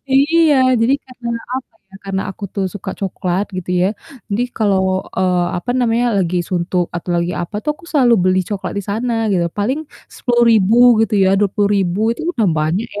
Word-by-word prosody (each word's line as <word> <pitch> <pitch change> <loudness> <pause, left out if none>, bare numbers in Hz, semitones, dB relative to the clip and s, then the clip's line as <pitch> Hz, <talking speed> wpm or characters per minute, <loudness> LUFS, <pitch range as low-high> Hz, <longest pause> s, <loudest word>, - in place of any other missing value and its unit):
Iya, 315 +2 +4 0.3
jadi 235 +4 +3
karena, 250 -2 -7 0.2
apa 260 -3 -6 0.2
ya, - - -18
karena 195 0 -2
aku 195 +2 -8
tuh 195 -2 -1
suka 205 - -5
coklat 190 -1 -1
gitu 180 0 -5
ya, 185 - +3 0.4
jadi 210 +4 0
kalau, 200 -4 +2 0.4
eee, 180 -1 +2
apa 245 +8 -5
namanya, 240 0 +1
lagi 180 -2 0
suntuk 180 0 0
atau 175 +1 -5
lagi 170 +1 -1
apa 175 +5 -8
tuh 300 - -1
aku 335 - -19
selalu 250 -5 +4
beli 185 0 +3
coklat 205 -2 -4
di - - -3
sana 235 +3 -1 0.2
gitu, 175 -3 +1
paling 250 +9 0 0.4
Rp10.000 230 -4 +3 0.3
gitu 220 -1 0
ya, 190 - +4
Rp20.000 200 -2 +1
itu - - -8
udah 230 - +1
banyak 165 +9 -1
ya, - - -2
205 Hz, 180 wpm, -17 LUFS, 185-240 Hz, 0.4 s, Iya